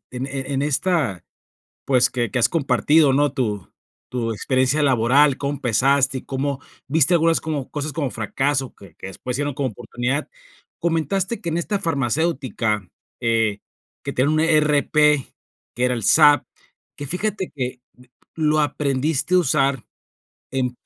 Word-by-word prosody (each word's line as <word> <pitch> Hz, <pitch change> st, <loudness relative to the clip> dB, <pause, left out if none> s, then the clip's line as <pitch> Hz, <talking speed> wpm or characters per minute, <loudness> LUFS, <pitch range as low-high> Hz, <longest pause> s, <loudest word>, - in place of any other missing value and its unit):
e 125 Hz, -, -9 dB
en 130 Hz, +2 st, -3 dB
e 135 Hz, 0 st, -5 dB
en 135 Hz, -, 0 dB
esta, 145 Hz, -, 0 dB, 0.6 s
pues, 130 Hz, -2 st, +3 dB
que 120 Hz, -3 st, -2 dB
que -, -, -1 dB
has 120 Hz, -, +4 dB
compartido, 145 Hz, 0 st, +3 dB
¿no? 145 Hz, +1 st, +2 dB
Tu 105 Hz, -, -3 dB, 0.4 s
tu 120 Hz, -2 st, -2 dB
experiencia 130 Hz, +6 st, +1 dB
laboral, 135 Hz, +2 st, +4 dB
cómo 140 Hz, 0 st, -3 dB
empezaste 135 Hz, +1 st, +1 dB
y -, -, -10 dB
cómo, 135 Hz, +1 st, -3 dB, 0.3 s
viste 155 Hz, +4 st, +3 dB
algunas 165 Hz, -1 st, +3 dB
como 150 Hz, -5 st, -4 dB
cosas 145 Hz, 0 st, -4 dB
como 140 Hz, -2 st, -2 dB
fracaso 135 Hz, +4 st, -1 dB
que 95 Hz, -5 st, -16 dB
que 95 Hz, -, -9 dB
después 125 Hz, +6 st, -6 dB
se -, -, -2 dB
hicieron 145 Hz, -1 st, -3 dB
como 135 Hz, -1 st, -2 dB
oportunidad. 120 Hz, +5 st, -3 dB, 0.5 s
Comentaste 170 Hz, -, -1 dB
que 170 Hz, -, -5 dB
en 165 Hz, +1 st, -1 dB
esta 200 Hz, +4 st, -2 dB
farmacéutica 135 Hz, -, -1 dB, 0.4 s
que 115 Hz, -3 st, +1 dB, 0.4 s
que, -, -, -3 dB
eh, -, -, -9 dB
tienen 140 Hz, +5 st, +2 dB
un -, -, +1 dB
ERP, 150 Hz, -3 st, +2 dB, 0.8 s
que 125 Hz, -, 0 dB
era 125 Hz, 0 st, +2 dB
el 115 Hz, -3 st, -4 dB
SAP, 145 Hz, +2 st, +6 dB, 0.5 s
que 145 Hz, -, -6 dB
fíjate 190 Hz, +4 st, -2 dB
que, 125 Hz, -1 st, -4 dB, 0.2 s
eh, 125 Hz, 0 st, -19 dB, 0.3 s
lo 155 Hz, -1 st, +2 dB
aprendiste 145 Hz, +2 st, 0 dB
a -, -, +6 dB
usar 140 Hz, -5 st, +1 dB, 0.7 s
en 125 Hz, -2 st, -1 dB
140 Hz, 160 wpm, -21 LUFS, 125-155 Hz, 0.8 s, SAP